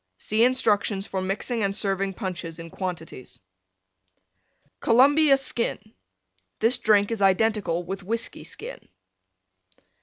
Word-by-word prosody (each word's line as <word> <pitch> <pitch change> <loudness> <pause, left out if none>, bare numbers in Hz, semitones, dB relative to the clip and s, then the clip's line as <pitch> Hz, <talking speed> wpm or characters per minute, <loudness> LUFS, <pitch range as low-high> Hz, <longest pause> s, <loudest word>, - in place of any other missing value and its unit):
(See 215 - +1
instructions 210 -5 +2
for 190 -3 -3
mixing 205 +4 -2
and 195 0 0
serving 195 -2 -1
Punches 175 -5 -5
in 165 -1 -9
quantities.) 170 -8 -6 1.4
COLUMBIA 275 +4 +5
SKIN 250 -3 -1 0.8
This 240 +3 +2
drink 205 0 +3
is 225 -3 -3
identical 195 -3 +2
with 190 +3 -6
Whiskey 225 +5 -4
Skin. - - -8
200 Hz, 110 wpm, -25 LUFS, 185-230 Hz, 1.4 s, COLUMBIA